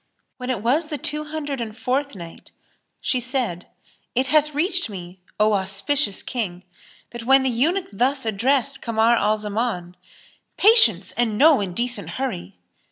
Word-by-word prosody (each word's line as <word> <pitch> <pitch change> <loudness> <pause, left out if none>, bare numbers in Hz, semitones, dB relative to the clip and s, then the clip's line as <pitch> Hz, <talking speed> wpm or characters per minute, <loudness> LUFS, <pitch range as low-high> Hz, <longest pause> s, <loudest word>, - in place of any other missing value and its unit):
When 250 0 -6
it 235 -5 -2
was 290 +7 +1
the 305 -2 -4
Two 300 +3 0
Hundred 295 -4 -5
and 220 -1 -6
Fourth 275 0 -2
Night, 170 -3 -11 0.5
She 255 - 0
said, 240 -8 -3 0.5
It 255 +2 +2
hath 300 +1 +2
reached 350 - +1
me, 180 -2 -9 0.2
O 215 0 +3
auspicious 200 +5 0
King, 190 -8 -4 0.5
that 235 -1 -8
when 270 +1 +5
the 260 - +1
eunuch 330 +11 +1
thus 260 +5 +1
addressed 265 +6 0
Kamar 230 0 +2
al 215 0 +1
Zaman, 210 -4 -3 0.6
"Patience, 230 - +5
and 225 -3 -1
no 300 +2 +6
indecent 200 0 -2
hurry!" 95 - -4
240 Hz, 150 wpm, -22 LUFS, 205-280 Hz, 0.6 s, no